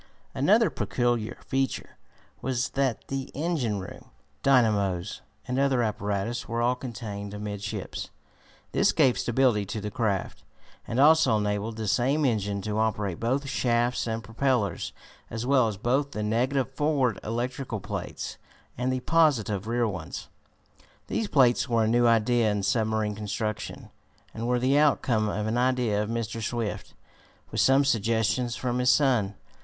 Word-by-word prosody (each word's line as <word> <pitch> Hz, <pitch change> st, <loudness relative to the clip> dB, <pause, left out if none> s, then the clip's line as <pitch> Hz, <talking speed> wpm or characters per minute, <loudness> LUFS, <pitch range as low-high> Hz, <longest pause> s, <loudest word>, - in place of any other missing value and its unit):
Another -, -, +3 dB
peculiar 120 Hz, -3 st, -1 dB
feature 135 Hz, -1 st, -2 dB, 0.5 s
was 130 Hz, 0 st, -1 dB
that 135 Hz, -4 st, -1 dB
the 135 Hz, -1 st, -3 dB
engine 145 Hz, -9 st, -1 dB
room, 95 Hz, -1 st, -9 dB, 0.4 s
dynamos 105 Hz, -8 st, +2 dB, 0.3 s
and 125 Hz, +1 st, -1 dB
other 135 Hz, -3 st, +2 dB
apparatus 105 Hz, +2 st, -2 dB
were 115 Hz, 0 st, -2 dB
all 120 Hz, +1 st, +3 dB
contained 105 Hz, -5 st, -6 dB
amidships. 105 Hz, 0 st, -5 dB, 0.6 s
This -, -, +3 dB
gave 130 Hz, -2 st, +3 dB
stability 120 Hz, -3 st, +2 dB
to 110 Hz, -, -4 dB
the 105 Hz, 0 st, -5 dB
craft, 100 Hz, -4 st, -2 dB, 0.4 s
and 120 Hz, -, -2 dB
also 145 Hz, -6 st, +6 dB
enabled 105 Hz, +1 st, -1 dB
the 110 Hz, -1 st, -3 dB
same 135 Hz, +8 st, +2 dB
engine 100 Hz, -5 st, 0 dB
to 105 Hz, +1 st, -2 dB
operate 105 Hz, -5 st, -1 dB
both 135 Hz, +5 st, 0 dB
shafts 120 Hz, -2 st, +1 dB
and 115 Hz, 0 st, -3 dB
propellers, 115 Hz, 0 st, 0 dB, 0.4 s
as 115 Hz, +1 st, -4 dB
well 130 Hz, -3 st, +4 dB
as 105 Hz, -3 st, -4 dB
both 135 Hz, +7 st, 0 dB
the 105 Hz, -, -3 dB
negative 130 Hz, +5 st, 0 dB
forward 135 Hz, -4 st, +1 dB
electrical 120 Hz, 0 st, -3 dB
plates, -, -, -6 dB, 0.4 s
and 125 Hz, +1 st, 0 dB
the 130 Hz, 0 st, -1 dB
positive 120 Hz, -, +2 dB
rear 120 Hz, 0 st, +1 dB
ones. 90 Hz, -6 st, -6 dB, 0.8 s
These 220 Hz, -, -1 dB
plates 130 Hz, -10 st, +3 dB
were 115 Hz, -1 st, +3 dB
a -, -, +1 dB
new 120 Hz, +1 st, +4 dB
idea 115 Hz, 0 st, +3 dB
in 105 Hz, -1 st, -1 dB
submarine 110 Hz, 0 st, +1 dB
construction, 105 Hz, +1 st, -4 dB, 0.4 s
and 115 Hz, +1 st, -4 dB
were 125 Hz, 0 st, +2 dB
the 130 Hz, +4 st, +3 dB
outcome 120 Hz, -7 st, +2 dB
of 105 Hz, +1 st, -2 dB
an 110 Hz, +2 st, 0 dB
idea 125 Hz, -5 st, +1 dB
of 105 Hz, -, -3 dB
Mr. 115 Hz, 0 st, -3 dB
Swift, 110 Hz, -2 st, -3 dB, 0.6 s
with -, -, +1 dB
some 135 Hz, +1 st, +5 dB
suggestions 115 Hz, 0 st, +1 dB
from 125 Hz, -1 st, -2 dB
his 125 Hz, 0 st, +3 dB
son. 120 Hz, -8 st, +3 dB
115 Hz, 150 wpm, -27 LUFS, 105-130 Hz, 0.8 s, also